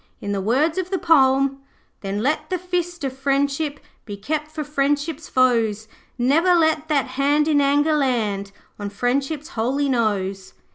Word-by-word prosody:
In 205 - -4
the 200 -1 -1
words 285 - +1
of 370 -1 -3
the 380 - 0
poem 275 -4 +3 0.4
'Then 200 +1 -3
let 305 +3 -1
the 370 - 0
fist 350 -2 -3
of 265 -1 -3
Friendship 280 +2 -1 0.3
Be 205 -2 -7
kept 300 +8 -3
for 310 0 -5
Friendship's 290 +2 -1
foes. 225 -4 +2 0.3
Ne'er 315 +9 +3
let 315 -2 +2
that 295 -4 +1
hand 290 +2 +1
in 295 -2 +3
anger 290 +2 +2
land 215 -8 -1 0.3
On 205 0 -4
Friendship's 270 +8 -2
holy 265 +5 -1
nose.' 200 -6 -1
275 Hz, 155 wpm, -22 LUFS, 235-310 Hz, 0.4 s, poem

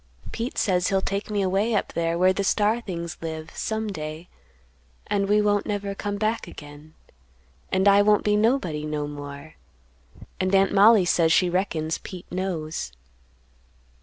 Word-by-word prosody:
Pete 230 +2 -4
says 180 -2 +1
he'll 195 - +2
take 200 +2 -3
me 205 -2 0
away 200 +4 +1
up 200 - -1
there 165 0 0
where 185 +1 +4
the 200 - -2
star 215 +4 +2
things 170 -5 -6
live, 160 -1 -6
some 220 0 -2
day, 155 -1 -6 0.8
and 200 -1 -1
we 210 0 +4
won't 205 -1 +1
never 205 -1 -2
come 205 +1 -4
back 215 +2 -1
again; 150 +1 -12 0.8
and 190 +1 +2
I 200 0 +7
won't 210 0 +3
be 210 0 +2
nobody 210 - +1
no 150 -1 -3
more; 145 - -8 0.9
and 185 +1 +1
Aunt 195 0 +3
Mollie 205 0 +6
says 165 -2 +3
she 180 +1 +3
reckons 165 -4 -1
Pete 185 -3 -9
knows. 170 - -3
190 Hz, 160 wpm, -24 LUFS, 160-205 Hz, 0.9 s, I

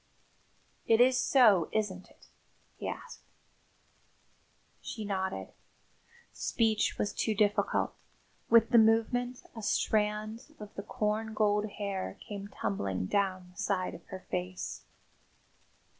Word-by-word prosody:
"It 225 0 +5
is 255 +1 +6
so, 220 - +5
isn't 195 -4 -2
it?" - - -21 0.5
he - - -6
asked. - - -7 1.6
She 220 -2 -6
nodded. 190 -1 -2 0.8
Speech 220 -2 +1
was 205 - -1
too 220 - 0
difficult. 205 0 +2 0.6
With 230 0 +6
the 235 - +8
movement 230 +3 +2
a 225 - -6
strand 215 +6 0
of 210 -1 -9
the - - -5
corn 215 +2 -2
gold 210 0 +2
hair 200 -2 -3
came 200 -1 -7
tumbling 100 - -2
down 185 - 0
the 180 - -23
side 185 -2 0
of 170 - -10
her 190 -1 -7
face. 180 0 -4
210 Hz, 115 wpm, -31 LUFS, 190-225 Hz, 1.6 s, the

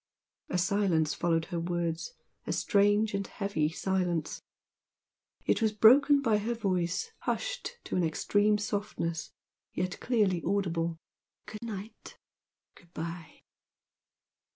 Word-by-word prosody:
A 180 - 0
silence 180 -4 +2
followed 165 -1 +1
her 170 - 0
words, 170 - -2 0.3
a - - -1
strange 205 +1 +3
and 200 0 -2
heavy 180 -7 -1
silence. 175 -2 -1 1.0
It - - +2
was 220 -1 +2
broken 275 +7 +6
by 220 -4 +3
her 230 +3 -2
voice 185 - -1
hushed - - -3
to - - -4
an 180 - +2
extreme 205 +6 +2
softness, 205 -6 -3 0.4
yet 185 +1 -2
clearly 205 -8 +1
audible. 170 -4 0 0.5
"Good 215 - -9
night! 220 -2 -8 0.6
good 170 -2 -21
bye!" 165 0 -6
195 Hz, 115 wpm, -30 LUFS, 170-215 Hz, 1.0 s, broken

